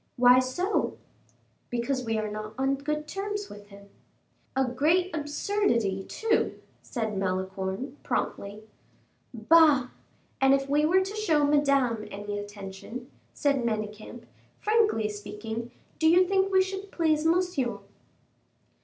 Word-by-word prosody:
"Why 250 Hz, +1 st, +7 dB
so?" 355 Hz, +11 st, -1 dB, 0.7 s
"Because 255 Hz, +2 st, -1 dB
we 225 Hz, -2 st, -1 dB
are 215 Hz, 0 st, -1 dB
not 215 Hz, +1 st, -6 dB
on 270 Hz, +1 st, +1 dB
good 300 Hz, +2 st, -3 dB
terms 410 Hz, +3 st, -4 dB
with 205 Hz, 0 st, -11 dB
him." 200 Hz, 0 st, -15 dB, 0.7 s
"A 265 Hz, 0 st, +3 dB
great 320 Hz, +9 st, +1 dB
absurdity, 290 Hz, -, 0 dB
too," 445 Hz, -1 st, 0 dB, 0.2 s
said 220 Hz, -4 st, -3 dB
Malicorne, 190 Hz, +6 st, -3 dB
promptly. 205 Hz, +2 st, -3 dB, 0.7 s
"Bah! 275 Hz, +2 st, +5 dB, 0.5 s
and 270 Hz, 0 st, +6 dB
if 275 Hz, 0 st, -2 dB
we 295 Hz, +2 st, +2 dB
were 370 Hz, +4 st, +4 dB
to 385 Hz, +2 st, -4 dB
show 330 Hz, -9 st, +2 dB
Madame 275 Hz, -6 st, +2 dB
any 205 Hz, +1 st, -5 dB
attention," 205 Hz, +5 st, -8 dB, 0.2 s
said 280 Hz, -3 st, +1 dB
Manicamp, 215 Hz, +1 st, -4 dB, 0.3 s
"frankly 425 Hz, -, +2 dB
speaking, 215 Hz, +3 st, -6 dB, 0.3 s
do 320 Hz, -, +5 dB
you 360 Hz, +2 st, +5 dB
think 390 Hz, 0 st, +2 dB
we 380 Hz, 0 st, +5 dB
should 385 Hz, +1 st, -6 dB
please 310 Hz, -2 st, +1 dB
Monsieur?" 330 Hz, -7 st, +1 dB
265 Hz, 125 wpm, -27 LUFS, 215-330 Hz, 0.7 s, Why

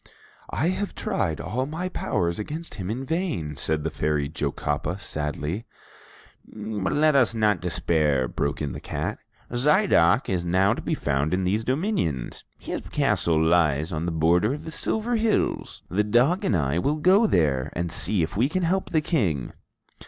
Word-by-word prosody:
"I 160 Hz, -, 0 dB
have 195 Hz, +2 st, -3 dB
tried 190 Hz, -, -1 dB
all 130 Hz, +4 st, -2 dB
my 165 Hz, +5 st, -3 dB
powers 85 Hz, -, -1 dB
against 155 Hz, +10 st, -5 dB
him 95 Hz, -3 st, -5 dB
in 125 Hz, +5 st, -3 dB
vain," 155 Hz, -, -2 dB
said 75 Hz, +3 st, -1 dB
the 80 Hz, -, -2 dB
Fairy 75 Hz, -1 st, 0 dB
Jocapa, 75 Hz, +4 st, -2 dB
sadly. 75 Hz, +2 st, -3 dB, 0.8 s
"But 105 Hz, -2 st, -4 dB
let 155 Hz, 0 st, +3 dB
us 125 Hz, -4 st, +3 dB
not 105 Hz, -3 st, +2 dB
despair," 75 Hz, -6 st, +1 dB
broke 70 Hz, +3 st, -2 dB
in 70 Hz, -, -2 dB
the -, -, -6 dB
cat. -, -, -4 dB, 0.3 s
"Zidoc 130 Hz, -, +3 dB
is 90 Hz, -2 st, -1 dB
now 95 Hz, +4 st, +3 dB
to -, -, -5 dB
be -, -, -1 dB
found 75 Hz, +4 st, 0 dB
in 95 Hz, -, -1 dB
these 100 Hz, +5 st, 0 dB
dominions. 130 Hz, -, -1 dB
His -, -, -6 dB
castle 80 Hz, -2 st, +2 dB
lies 80 Hz, -1 st, +2 dB
on 80 Hz, +2 st, -2 dB
the -, -, -1 dB
border 85 Hz, -, +2 dB
of -, -, -9 dB
the 160 Hz, -, -6 dB
Silver 220 Hz, +8 st, -1 dB
Hills. 220 Hz, -1 st, -1 dB
The 100 Hz, +6 st, +1 dB
dog 125 Hz, -, +2 dB
and 100 Hz, -, +2 dB
I 75 Hz, +2 st, 0 dB
will 145 Hz, +11 st, +1 dB
go 190 Hz, +8 st, +5 dB
there, 70 Hz, -, +1 dB
and 85 Hz, 0 st, -2 dB
see 100 Hz, -2 st, +2 dB
if 80 Hz, +5 st, -4 dB
we 120 Hz, +7 st, +2 dB
can 185 Hz, +3 st, -1 dB
help 185 Hz, +3 st, 0 dB
the 160 Hz, -3 st, +2 dB
King." 95 Hz, -, -1 dB
95 Hz, 175 wpm, -25 LUFS, -, 0.8 s, go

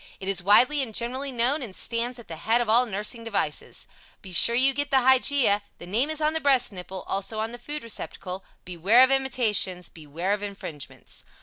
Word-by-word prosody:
It 190 Hz, -, -8 dB
is 195 Hz, -1 st, -1 dB
widely 250 Hz, +10 st, +4 dB
and 225 Hz, -5 st, -5 dB
generally 260 Hz, +4 st, -3 dB
known, 250 Hz, +5 st, +1 dB
and 215 Hz, -7 st, -6 dB
stands 240 Hz, +2 st, -1 dB
at 235 Hz, -, -13 dB
the 165 Hz, -, -8 dB
head 225 Hz, +8 st, +2 dB
of 240 Hz, -, -1 dB
all 240 Hz, +3 st, +4 dB
nursing 210 Hz, +3 st, -3 dB
devices. 205 Hz, -10 st, -3 dB, 0.4 s
Be 185 Hz, -, -9 dB
sure 235 Hz, +6 st, +5 dB
you 265 Hz, +2 st, +5 dB
get 285 Hz, +1 st, -2 dB
the 265 Hz, -2 st, +3 dB
Hygeia. 260 Hz, -4 st, +3 dB, 0.2 s
The -, -, -11 dB
name 225 Hz, +11 st, 0 dB
is 315 Hz, -1 st, -2 dB
on 305 Hz, +1 st, +1 dB
the 320 Hz, -, -1 dB
breast 270 Hz, -5 st, +2 dB
nipple; 185 Hz, 0 st, -8 dB
also, 200 Hz, +3 st, -3 dB
on 220 Hz, +1 st, -2 dB
the 240 Hz, -, -8 dB
food 295 Hz, +4 st, -6 dB
receptacle. 190 Hz, -4 st, -6 dB, 0.2 s
Beware 185 Hz, +8 st, +4 dB
of 260 Hz, -, +3 dB
imitations! 225 Hz, -9 st, +1 dB
Beware 165 Hz, +5 st, -4 dB
of 205 Hz, -, -3 dB
infringements! 195 Hz, -8 st, -7 dB
230 Hz, 205 wpm, -25 LUFS, 195-260 Hz, 0.4 s, sure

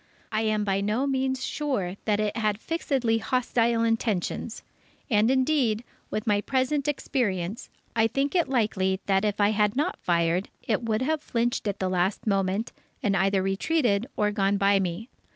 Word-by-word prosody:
I 215 Hz, -, 0 dB
am 215 Hz, -1 st, +1 dB
by 195 Hz, -1 st, 0 dB
no 215 Hz, +7 st, 0 dB
means 265 Hz, -1 st, 0 dB
sure 235 Hz, -12 st, -2 dB
that 210 Hz, -1 st, +1 dB
it 210 Hz, -1 st, -1 dB
had 215 Hz, -2 st, 0 dB
fixedly 260 Hz, -7 st, 0 dB
hostile 235 Hz, -1 st, +1 dB
intentions. 225 Hz, -1 st, -1 dB, 0.5 s
And 215 Hz, +1 st, +4 dB
indeed, 260 Hz, -4 st, +2 dB, 0.3 s
with 215 Hz, -, -3 dB
my 205 Hz, -2 st, +2 dB
present 270 Hz, +4 st, 0 dB
experience, 215 Hz, -9 st, -2 dB, 0.3 s
I 225 Hz, 0 st, +4 dB
think 275 Hz, +5 st, -1 dB
it 345 Hz, -4 st, +2 dB
likely 195 Hz, -7 st, +1 dB
that 195 Hz, 0 st, +2 dB
if 210 Hz, -1 st, -1 dB
I 205 Hz, 0 st, +4 dB
had 210 Hz, 0 st, +1 dB
not 290 Hz, +3 st, -1 dB
fired, 170 Hz, +2 st, +1 dB, 0.2 s
it 220 Hz, -1 st, +1 dB
would 225 Hz, 0 st, 0 dB
have 310 Hz, +2 st, 0 dB
flinched 240 Hz, -4 st, -1 dB
at 200 Hz, -1 st, -1 dB
the 190 Hz, -, -1 dB
last 185 Hz, +2 st, 0 dB
moment, 195 Hz, +1 st, 0 dB, 0.3 s
and 200 Hz, -3 st, +2 dB
either 195 Hz, 0 st, +2 dB
retreated 215 Hz, +2 st, +1 dB
or 210 Hz, 0 st, +2 dB
gone 200 Hz, -1 st, +1 dB
by 200 Hz, 0 st, +4 dB
me. 190 Hz, +4 st, -3 dB
215 Hz, 170 wpm, -26 LUFS, 195-255 Hz, 0.5 s, And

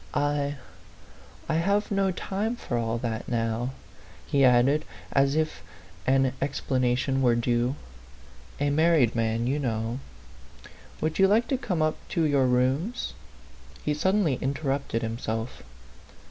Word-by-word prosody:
" -, -, -24 dB
I 145 Hz, 0 st, 0 dB, 0.9 s
I 165 Hz, -, 0 dB
have 200 Hz, +5 st, +1 dB
no 195 Hz, -1 st, +2 dB
time 200 Hz, +5 st, -2 dB
for 135 Hz, -, -4 dB
all 115 Hz, -1 st, 0 dB
that 115 Hz, -1 st, -3 dB
now," 115 Hz, 0 st, -1 dB, 0.6 s
he 140 Hz, -1 st, +2 dB
added, 130 Hz, +4 st, +5 dB, 0.3 s
as 140 Hz, +1 st, +3 dB
if 155 Hz, 0 st, -1 dB, 0.5 s
an 135 Hz, -1 st, +3 dB
ex 140 Hz, +1 st, -1 dB
planation 130 Hz, +1 st, +1 dB
were 120 Hz, -2 st, +4 dB
due. 120 Hz, +2 st, +1 dB, 0.8 s
"A 145 Hz, 0 st, +1 dB
married 155 Hz, -5 st, +4 dB
man 115 Hz, 0 st, 0 dB
you 135 Hz, +4 st, 0 dB
know. 115 Hz, -2 st, -2 dB, 1.0 s
Would 155 Hz, +2 st, -1 dB
you 195 Hz, -, +7 dB
like 220 Hz, +4 st, +3 dB
to 270 Hz, -, +2 dB
come 180 Hz, -, 0 dB
up 155 Hz, 0 st, +1 dB, 0.2 s
to 165 Hz, -, +4 dB
your 140 Hz, -4 st, +3 dB
rooms?" 130 Hz, -, 0 dB, 0.7 s
he 150 Hz, -, +2 dB
suddenly 165 Hz, -3 st, +1 dB
interrupted 135 Hz, -3 st, -1 dB
him 115 Hz, +1 st, -3 dB
self. 115 Hz, +2 st, -4 dB
135 Hz, 140 wpm, -27 LUFS, 120-155 Hz, 1.0 s, you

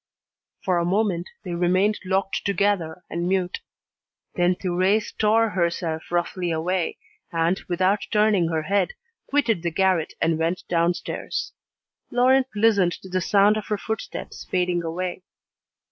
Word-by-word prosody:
For 180 Hz, -3 st, +2 dB
a -, -, +1 dB
moment 185 Hz, -1 st, 0 dB
they 180 Hz, -3 st, -5 dB
remained 185 Hz, +4 st, +2 dB
locked 190 Hz, +1 st, 0 dB
together 190 Hz, -4 st, 0 dB
and 170 Hz, +1 st, -2 dB
mute. 185 Hz, -2 st, 0 dB, 0.7 s
Then 175 Hz, 0 st, +2 dB
Thérèse 185 Hz, +4 st, 0 dB
tore 225 Hz, +1 st, +3 dB
herself 170 Hz, -3 st, -1 dB
roughly 175 Hz, +1 st, -1 dB
away, 170 Hz, +2 st, -1 dB, 0.3 s
and, 165 Hz, +2 st, +1 dB
without 185 Hz, +3 st, +1 dB
turning 210 Hz, -5 st, +3 dB
her 160 Hz, -1 st, -1 dB
head, 200 Hz, -, +1 dB, 0.3 s
quitted 240 Hz, -, +1 dB
the 170 Hz, -, 0 dB
garret 185 Hz, -1 st, +1 dB
and 165 Hz, -1 st, +1 dB
went 165 Hz, +3 st, -1 dB
downstairs. 170 Hz, 0 st, -1 dB, 0.6 s
Laurent 260 Hz, +2 st, +4 dB
listened 205 Hz, -5 st, +3 dB
to 190 Hz, -, -10 dB
the 185 Hz, 0 st, 0 dB
sound 205 Hz, +3 st, +4 dB
of 215 Hz, -, -5 dB
her 210 Hz, -, 0 dB
footsteps 220 Hz, +1 st, -5 dB
fading 180 Hz, -1 st, +1 dB
away. 175 Hz, +2 st, -3 dB
185 Hz, 135 wpm, -24 LUFS, 170-205 Hz, 0.7 s, Laurent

